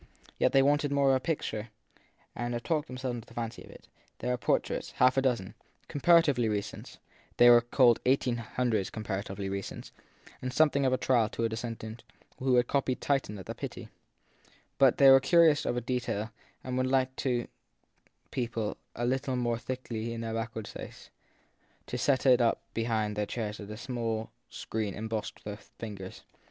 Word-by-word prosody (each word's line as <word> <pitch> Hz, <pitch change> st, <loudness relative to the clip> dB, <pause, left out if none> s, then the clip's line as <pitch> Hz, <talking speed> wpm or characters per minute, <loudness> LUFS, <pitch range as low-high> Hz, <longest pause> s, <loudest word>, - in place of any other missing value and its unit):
Yet -, -, +3 dB
they 135 Hz, -, +5 dB
wanted 145 Hz, +1 st, +2 dB
more 140 Hz, -1 st, +4 dB
of 130 Hz, -, +4 dB
a -, -, -4 dB
picture 120 Hz, -7 st, -3 dB, 0.7 s
and 120 Hz, 0 st, -2 dB
talked 155 Hz, -3 st, 0 dB
them 125 Hz, -, -7 dB
selves 130 Hz, -1 st, -3 dB
into 115 Hz, -, -10 dB
the 115 Hz, -, -16 dB
fancy 115 Hz, 0 st, -4 dB
of -, -, -15 dB
it; -, -, -15 dB, 0.3 s
there 125 Hz, -, -2 dB
were 125 Hz, -, 0 dB
portraits -, -, -1 dB
half 125 Hz, 0 st, +4 dB
a 135 Hz, -, +3 dB
dozen, 125 Hz, -8 st, 0 dB, 0.3 s
comparatively 145 Hz, -6 st, +4 dB
recent 105 Hz, -1 st, -4 dB, 0.4 s
(they 120 Hz, -, +7 dB, 0.2 s
called 120 Hz, -4 st, +5 dB
1800 120 Hz, -4 st, 0 dB
comparatively 100 Hz, -2 st, -4 dB
recent), 100 Hz, 0 st, -5 dB, 0.5 s
and 130 Hz, -, -3 dB
something 140 Hz, -1 st, +3 dB
of -, -, +2 dB
a -, -, +3 dB
trial 120 Hz, -5 st, +2 dB
to 115 Hz, -, -3 dB
a 115 Hz, -, +2 dB
descendant 115 Hz, 0 st, -6 dB, 0.4 s
who 130 Hz, -1 st, +2 dB
had 125 Hz, 0 st, +4 dB
copied 130 Hz, -1 st, 0 dB
Titian 135 Hz, -7 st, 0 dB
at 95 Hz, -, -9 dB
the -, -, -5 dB
Pitti; -, -, -7 dB, 0.9 s
but 135 Hz, -3 st, +5 dB
they 135 Hz, -1 st, +8 dB
were 135 Hz, -, +9 dB
curious 155 Hz, +2 st, +4 dB
of 120 Hz, -1 st, -1 dB
detail 120 Hz, -4 st, -2 dB, 0.3 s
and 130 Hz, 0 st, -3 dB
would 130 Hz, 0 st, +1 dB
have -, -, -2 dB
liked 130 Hz, -1 st, +1 dB
to 120 Hz, -3 st, -1 dB, 0.8 s
people 115 Hz, -4 st, -2 dB, 0.2 s
a 120 Hz, -, -2 dB
little 130 Hz, +1 st, 0 dB
more 120 Hz, -2 st, 0 dB
thickly 115 Hz, -3 st, -4 dB
their 115 Hz, 0 st, -4 dB
back 115 Hz, 0 st, -3 dB
ward 110 Hz, -2 st, -4 dB
space, -, -, -10 dB, 0.7 s
to -, -, -5 dB
set 140 Hz, -1 st, +2 dB
it 125 Hz, -2 st, +6 dB
up 115 Hz, -, +2 dB
behind 110 Hz, -2 st, -1 dB
their 105 Hz, 0 st, -1 dB
chairs 105 Hz, -3 st, -4 dB
as 100 Hz, -1 st, -8 dB
a 115 Hz, 0 st, -3 dB, 0.2 s
screen 110 Hz, -3 st, -4 dB
embossed 110 Hz, 0 st, -5 dB
with 105 Hz, 0 st, -8 dB
figures. 100 Hz, -4 st, -8 dB
120 Hz, 175 wpm, -30 LUFS, 110-130 Hz, 0.9 s, were